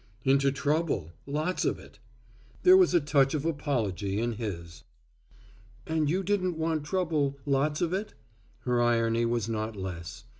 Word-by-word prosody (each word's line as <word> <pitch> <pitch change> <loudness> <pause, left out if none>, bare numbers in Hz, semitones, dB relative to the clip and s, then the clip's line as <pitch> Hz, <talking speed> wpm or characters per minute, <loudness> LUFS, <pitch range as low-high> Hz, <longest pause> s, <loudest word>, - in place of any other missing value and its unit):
"Into 135 +1 +3
trouble, 145 - -1 0.2
lots 155 +6 -1
of - - 0
it." - - -16 0.6
There 370 0 +8
was 370 - +5
a - - +7
touch 140 -2 +2
of 150 0 -2
apology 110 - -1
in 120 +1 0
his. 85 -8 -6 1.0
"And 160 -2 0
you 185 +4 0
didn't 185 -3 0
want 160 -1 -1
trouble, 150 -5 0
lots 145 +2 +1
of 175 0 0
it?" 205 +3 -3 0.5
Her 125 -1 +1
irony 115 -1 +2
was 115 -2 0
not 110 -1 -3
less. 90 -4 -6
140 Hz, 150 wpm, -28 LUFS, 115-160 Hz, 1.0 s, There